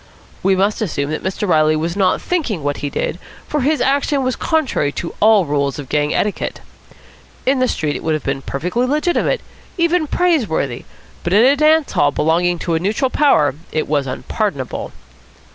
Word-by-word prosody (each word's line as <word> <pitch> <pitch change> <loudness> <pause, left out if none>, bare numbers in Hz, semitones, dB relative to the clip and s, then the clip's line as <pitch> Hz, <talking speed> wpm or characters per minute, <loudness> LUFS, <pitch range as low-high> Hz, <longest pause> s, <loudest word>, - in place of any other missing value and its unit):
We 190 0 +3
must 200 +4 0
assume 150 -8 -2
that 155 - -3
Mr. 190 +2 -2
Reilly 155 -2 +3
was 165 +3 -2
not 195 -2 +2
thinking 265 - -1
what 145 0 -1
he 145 - -3
did, 160 - -3 0.3
for 300 - -1
his 300 +4 +1
action 280 0 +1
was 255 -1 0
contrary 295 - 0
to 170 - -5
all 215 -3 +5
rules 140 -2 -1
of 145 -3 -8
gang 150 0 +1
etiquette. 210 - -1 0.9
In 265 0 +2
the 255 - +3
street 150 -10 -1
it - - -4
would 160 -1 +1
have 155 - -4
been 135 0 -2
perfectly 180 - -2
legitimate, 305 - +1 0.4
even 340 -2 +2
praiseworthy, 230 - 0 0.4
but 175 - -1
in 215 +4 +6
a 275 +2 +5
dance 305 +1 +3
hall 145 - +3
belonging 170 +4 +1
to 170 - -2
a 160 - +1
neutral 220 - 0
power 155 - +3 0.2
it 155 - -1
was 145 -2 0
unpardonable. 140 - -3
190 Hz, 180 wpm, -18 LUFS, -, 0.9 s, in